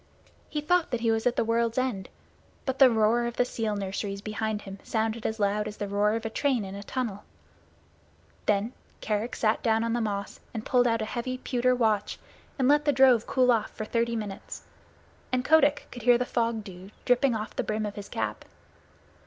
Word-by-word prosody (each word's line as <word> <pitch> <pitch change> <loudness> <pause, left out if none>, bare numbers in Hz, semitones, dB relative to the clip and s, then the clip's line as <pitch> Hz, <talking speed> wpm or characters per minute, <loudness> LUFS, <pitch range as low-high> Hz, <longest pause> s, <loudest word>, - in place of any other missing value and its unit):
He 300 - -2
thought 355 +2 +2
that 245 -3 -2
he 230 -1 +2
was 225 +1 +1
at 245 - +1
the - - +2
world's 230 +1 0
end, 250 -7 -1 0.6
but 265 0 -2
the 265 -2 +9
roar 225 +1 +2
of 240 - -5
the 245 - +3
seal 220 -3 -2
nurseries 200 0 -3
behind 215 0 -3
him 195 -1 -9
sounded 225 0 -1
as 220 0 -4
loud 210 +1 +1
as 210 - -7
the 205 - -3
roar 205 +1 +2
of 225 0 -4
a - - -1
train 255 -5 0
in 190 - -7
a 200 - -6
tunnel. 210 -2 -4 1.2
Then 210 +3 +1 0.3
Kerick 215 +2 -2
sat 220 0 +1
down 225 -1 +2
on 230 0 -1
the 240 - 0
moss 200 -2 -3 0.2
and 220 - -4
pulled 245 -1 +3
out 230 -1 +1
a - - -2
heavy 250 +3 -3
pewter 255 -1 +1
watch 215 -4 +1 0.4
and 260 -2 +2
let 295 +1 +4
the 290 - +4
drove 255 -4 +5
cool 255 -1 +3
off 225 -3 +1
for 215 - -3
thirty 235 +1 0
minutes, 210 -3 -6 0.7
and 250 0 0
Kotick 295 -2 +4
could 245 - -8
hear 240 +1 +5
the 250 - -1
fog 230 -3 -1
dew 185 -1 -11 0.2
dripping 245 0 +3
off 215 0 -5
the - - -1
brim 215 0 -2
of 205 - -4
his 205 -1 -8
cap. 105 -1 -3
225 Hz, 210 wpm, -27 LUFS, 210-245 Hz, 1.2 s, the